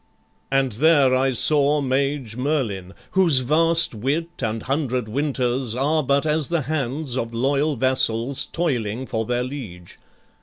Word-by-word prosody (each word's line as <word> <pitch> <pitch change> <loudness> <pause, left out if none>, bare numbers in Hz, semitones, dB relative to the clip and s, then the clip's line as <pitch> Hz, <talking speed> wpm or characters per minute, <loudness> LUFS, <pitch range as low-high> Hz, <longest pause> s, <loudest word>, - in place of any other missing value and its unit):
"And 135 -1 +1
there 140 +2 +4
I 135 +1 +2
saw 145 +3 +3
mage 135 -3 -1
Merlin, 115 -9 -2 0.2
whose 170 -8 +3
vast 165 +5 +2
wit 140 +10 -2
And 115 -2 -2
hundred 130 -4 -1
winters 130 -2 -1
are 150 +5 +1
but 140 +1 +1
as 155 -1 +1
the 170 -2 0
hands 140 -1 -2
Of 115 -2 -3
loyal 140 +5 +1
vassals 130 0 0
toiling 125 -8 -2
for 110 -3 -3
their 120 +2 -1
liege. 115 -11 -8
135 Hz, 140 wpm, -22 LUFS, 120-150 Hz, 0.2 s, there